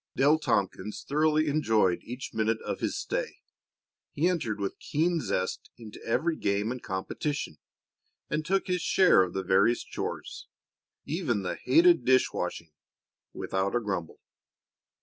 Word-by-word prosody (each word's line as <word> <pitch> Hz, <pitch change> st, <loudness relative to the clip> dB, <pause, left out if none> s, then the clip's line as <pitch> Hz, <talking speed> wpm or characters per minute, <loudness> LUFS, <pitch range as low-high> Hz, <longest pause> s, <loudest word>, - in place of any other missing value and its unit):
Dale 150 Hz, +3 st, +4 dB
Tompkins 100 Hz, -, -1 dB
thoroughly 155 Hz, +2 st, +2 dB
enjoyed 110 Hz, -, +2 dB
each 125 Hz, +3 st, -7 dB
minute 110 Hz, 0 st, 0 dB
of -, -, -3 dB
his -, -, -2 dB
stay. -, -, -3 dB, 0.8 s
He 160 Hz, +5 st, +2 dB
entered 130 Hz, -, -1 dB
with 100 Hz, -1 st, -3 dB
keen 165 Hz, +2 st, 0 dB
zest 95 Hz, -8 st, -2 dB
into 110 Hz, -3 st, -11 dB
every 160 Hz, +8 st, 0 dB
game 100 Hz, +3 st, 0 dB
and 125 Hz, -1 st, -5 dB
competition, 95 Hz, -, -4 dB, 0.7 s
and 155 Hz, -, -1 dB
took 190 Hz, +4 st, 0 dB
his 180 Hz, -2 st, -1 dB
share 185 Hz, -, +5 dB
of 90 Hz, -2 st, -1 dB
the 95 Hz, -, -2 dB
various 100 Hz, +6 st, +3 dB
chores -, -, -6 dB, 0.6 s
even 140 Hz, -, -1 dB
the 90 Hz, -, -2 dB
hated 345 Hz, +1 st, +4 dB
dish 130 Hz, 0 st, +3 dB
washing 80 Hz, -1 st, -4 dB, 0.6 s
without 95 Hz, +3 st, -1 dB
a -, -, +3 dB
grumble. 95 Hz, -7 st, -4 dB
120 Hz, 140 wpm, -28 LUFS, 100-155 Hz, 0.8 s, share